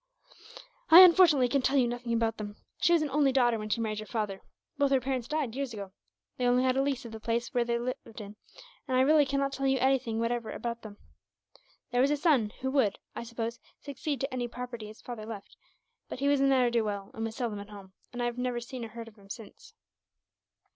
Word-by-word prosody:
"I, 340 +3 +11
unfortunately, 335 -7 +6
can 275 +3 +1
tell 270 +2 +2
you 250 -3 +4
nothing 240 0 -4
about 230 -1 0
them. 205 -1 -6 0.2
She - - +3
was 335 -2 +4
an 295 - -3
only 285 -1 +3
daughter 240 -3 +2
when 215 0 -5
she 230 - 0
married 215 -2 -2
your 215 - -7
father. 210 -4 -3 0.4
Both 285 -1 +3
her 270 -1 +3
parents 255 -2 -3
died, 295 -6 -2
years 270 -4 -3
ago. 200 -2 -7 0.5
They 250 - +1
only 250 +1 +3
had 255 0 +2
a 270 - +2
lease 275 -3 -1
of 230 - -8
the 220 - -8
place 235 +2 -2
they 235 -1 +1
lived 240 -2 -5
in, 205 0 -9 0.5
and 255 -2 +1
I - - +5
really 295 +1 +5
cannot 275 0 0
tell 275 0 -1
you 265 0 +3
anything 255 -3 +1
whatever 230 -1 -1
about 235 0 -4
them. 205 -2 -10 0.9
There 245 0 +2
was 270 - +4
a 295 - +1
son, 280 -9 +3
who 265 0 -1
would, 255 -8 +2 0.2
I - - -4
suppose, 230 0 -5 0.2
succeed 285 0 -4
to 270 0 -3
any 245 -1 -2
property 240 -2 -7
his 215 +1 -13
father 225 -3 -7
left; 210 -3 -9 0.5
but - - -5
he 280 - 0
was 285 -1 +3
a 275 - +3
ne'er 260 -3 +3
do 235 -1 +2
well, 200 -2 -4
and 225 - -5
was 225 0 -4
seldom 230 -5 -3
at 200 +1 -9
home, 195 -2 -12 0.2
and 245 -1 -4
I - - +1
have 240 0 -3
never 250 -1 -1
seen 240 +1 -7
or - - -4
heard 230 +1 -9
of 225 -1 -15
him, 195 0 -18
since." 230 - -11
245 Hz, 235 wpm, -29 LUFS, 225-270 Hz, 0.9 s, I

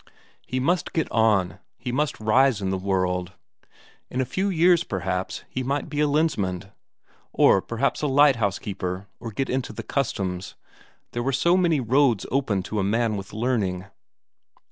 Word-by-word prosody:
He 130 - -2
must 170 +5 0
get 160 - 0
on, 105 -5 +2 0.2
he 120 +2 -5
must 145 +3 -1
rise 120 +2 +3
in 95 -1 -2
the 95 - 0
world. 90 -1 -1 0.8
In 125 - -4
a 130 - +1
few 190 +10 -1
years, 175 -1 +4
perhaps, 95 - -3
he 130 - -4
might 140 +4 -2
be 145 0 -3
a 150 - +3
Lensmand, 100 - 0 0.6
or 95 - +4
perhaps 115 +7 -1
a 150 - +1
lighthouse 130 -8 +3
keeper, 95 -1 -5
or 115 - -6
get 135 +6 -2
into 130 0 -2
the - - -6
Customs. 95 -9 -2 0.6
There 120 - -3
were 135 +3 0
so 170 +6 +3
many 170 -5 +3
roads 125 -3 +2
open 110 -8 0
to 105 +3 -3
a - - +1
man 110 +2 +1
with 95 -1 -7
learning. 105 -5 -1
115 Hz, 165 wpm, -24 LUFS, 95-140 Hz, 0.8 s, years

